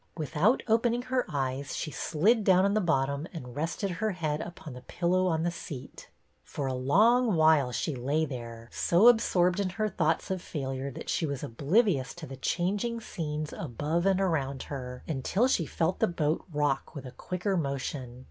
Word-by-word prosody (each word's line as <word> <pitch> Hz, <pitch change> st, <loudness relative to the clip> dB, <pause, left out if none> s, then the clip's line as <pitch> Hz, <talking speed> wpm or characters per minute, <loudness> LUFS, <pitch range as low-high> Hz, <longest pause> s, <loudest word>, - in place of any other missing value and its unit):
Without 165 Hz, -, +2 dB
opening 235 Hz, +2 st, +2 dB
her 255 Hz, 0 st, -1 dB
eyes 135 Hz, 0 st, -2 dB
she 155 Hz, -, -3 dB
slid 205 Hz, +12 st, +2 dB
down 185 Hz, -1 st, +5 dB
on 200 Hz, -, +2 dB
the 215 Hz, -, +2 dB
bottom 140 Hz, -3 st, 0 dB
and 125 Hz, -8 st, -8 dB
rested 165 Hz, +6 st, -2 dB
her 210 Hz, +4 st, -1 dB
head 155 Hz, -4 st, -2 dB
upon 165 Hz, -4 st, -8 dB
the 125 Hz, -, -9 dB
pillow 185 Hz, +6 st, 0 dB
on 160 Hz, -2 st, +1 dB
the 175 Hz, -, 0 dB
seat.. 145 Hz, -6 st, -9 dB, 0.3 s
For 140 Hz, -, -5 dB
a 130 Hz, -, -1 dB
long 215 Hz, -, +4 dB
while 155 Hz, -5 st, +4 dB
she 155 Hz, -, -2 dB
lay 140 Hz, +5 st, 0 dB
there, 115 Hz, -4 st, -7 dB
so 180 Hz, +7 st, +4 dB
absorbed 185 Hz, -6 st, +4 dB
in 195 Hz, -2 st, 0 dB
her 215 Hz, +3 st, -1 dB
thoughts 165 Hz, -2 st, 0 dB
of 185 Hz, -2 st, -2 dB
failure 135 Hz, -4 st, -4 dB
that 135 Hz, -, -9 dB
she 160 Hz, -, 0 dB
was 140 Hz, -2 st, -4 dB
oblivious 145 Hz, -, +1 dB
to 175 Hz, -2 st, -8 dB
the 135 Hz, -, -8 dB
changing 200 Hz, -, -1 dB
scenes 155 Hz, -7 st, -4 dB
above 160 Hz, +5 st, -1 dB
and 195 Hz, -1 st, +3 dB
around 140 Hz, -8 st, 0 dB
her, 125 Hz, -3 st, -7 dB
until 165 Hz, -, +1 dB
she 170 Hz, -, +1 dB
felt 165 Hz, +2 st, -1 dB
the -, -, +3 dB
boat 155 Hz, -3 st, -1 dB
rock 145 Hz, 0 st, -1 dB
with 140 Hz, -2 st, -7 dB
a 130 Hz, -, -7 dB
quicker 180 Hz, +8 st, -2 dB
motion. 135 Hz, -5 st, -3 dB
160 Hz, 185 wpm, -29 LUFS, 140-190 Hz, 0.3 s, down